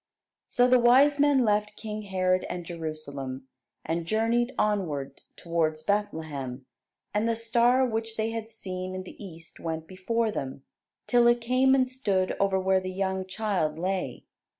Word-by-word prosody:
So 245 0 +3
the 250 0 +5
wise 270 +5 +5
men 280 -3 +4
left 210 0 +1
King 215 0 -5
Herod 185 -2 +1
and 175 -1 -5
Jerusalem, 145 -6 -6 0.4
and 165 +1 -2
journeyed 230 +4 +1
onward 160 -10 -1
towards 160 -2 -1
Bethlehem; 155 -10 -2 0.5
and 215 +2 +1
the 230 - +1
star 235 +3 +3
which 225 -1 -3
they 220 +1 0
had 225 -1 -5
seen 185 -4 -5
in 185 - -4
the 185 - -11
East 165 -4 -11
went 160 -1 -4
before 215 +6 -1
them, 135 -7 -5 0.4
till 240 -1 +4
it 240 0 +4
came 255 +3 +3
and 260 -1 +3
stood 200 -8 0
over 195 -1 +2
where 190 0 +3
the 185 0 -5
young 190 0 -2
child 185 -7 -1
lay. 185 +2 -2
195 Hz, 155 wpm, -27 LUFS, 170-230 Hz, 0.5 s, the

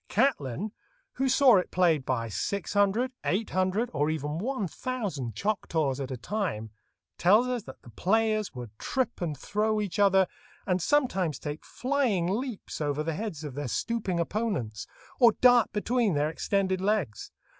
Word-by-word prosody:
Catlin, 205 - 0 0.5
who 265 0 +1
saw 260 -4 +6
it 180 - 0
played 165 -7 +2
by 115 -3 0
six 200 - -3
hundred, 205 +5 +2
eight 205 +4 -1
hundred, 185 +6 0
or 145 +1 +1
even 155 0 -2
one 230 -1 -2
thousand 175 - -4
Choctaws 160 - -1
at 135 -2 -4
a 130 - -4
time, 120 - -3 0.5
tells 210 +7 +5
us 250 -2 -1
that 130 - -12
the 120 - -13
players 215 - +1
would 120 -4 -7
trip 260 -7 -2
and 155 -5 -2
throw 215 +7 0
each 205 -2 -3
other, 195 -1 +5 0.4
and 185 -2 +1
sometimes 190 - +1
take 150 0 -6
flying 255 -9 0
leaps 220 -2 -3
over 145 0 0
the 165 +1 -2
heads 165 -4 -5
of 145 -3 -6
their 145 0 -4
stooping 195 - -1
opponents, 170 - -2 0.3
or 235 -4 +7
dart 245 -1 +5
between 215 -2 +1
their 150 +2 +1
extended 190 +2 0
legs. 190 - -1
190 Hz, 160 wpm, -28 LUFS, 150-220 Hz, 0.5 s, or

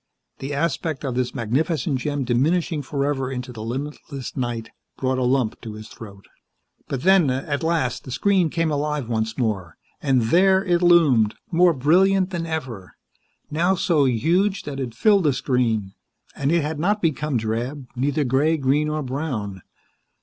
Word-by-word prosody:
The 135 +2 -5
aspect 155 0 -2
of 130 - -2
this 125 +1 -2
magnificent 140 - 0
gem 145 +1 -2
diminishing 150 +6 +1
forever 140 -1 -2
into 125 -1 -5
the 110 - -8
limitless 135 +2 -6
night 120 -3 -3 0.3
brought 130 0 0
a - - 0
lump 125 -3 0
to 110 -3 -7
his 110 0 -10
throat. 100 -3 -12 0.6
But 135 -2 -4
then, 190 -6 +5
at 140 +3 -2
last, 160 -7 0
the - - -10
screen 185 +5 +2
came 165 0 0
alive 150 -3 -1
once 110 -1 -2
more, 105 - -2 0.2
and 130 -4 +2
there 190 - +4
it 175 -2 +2
loomed, 150 -12 +4 0.2
more 175 0 +4
brilliant 185 +7 +3
than 170 -2 -3
ever, 130 - -5 0.6
now 175 +5 +2
so 160 -5 +2
huge 175 - +1
that 140 -2 -6
it 120 -4 -4
filled 200 - +3
the 145 - +3
screen, 115 -6 0 0.4
and 140 +1 0
it 170 -2 +2
had 150 0 -3
not 205 +6 +1
become 150 -3 0
drab, 120 +5 -3
neither 140 +4 0
gray 140 +5 +2
green 145 +2 +1
or 155 0 -2
brown. 125 - -4
140 Hz, 165 wpm, -23 LUFS, 125-165 Hz, 0.6 s, then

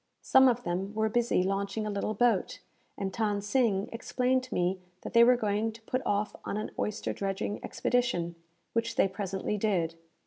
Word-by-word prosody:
Some 265 0 +6
of 245 -1 +2
them 190 +4 -3
were 220 0 +1
busy 235 -4 +2
launching 200 +3 -1
a 210 - -2
little 205 +1 -2
boat, 230 -4 +2 0.4
and 190 -1 -3
Than 210 -2 0
Sing 205 -2 +1
explained 250 +2 0
to 255 - -8
me 180 +2 +1 0.2
that - - -6
they 235 0 +8
were 245 +1 +6
going 215 0 0
to 225 - -14
put 255 +3 -1
off 205 +1 0
on - - -3
an 215 - -4
oyster 210 0 -2
dredging 200 +1 -3
expedition, 240 -9 0 0.4
which 230 0 0
they - - +4
presently 195 +1 -3
did. 180 -6 +1
210 Hz, 180 wpm, -30 LUFS, 195-235 Hz, 0.4 s, they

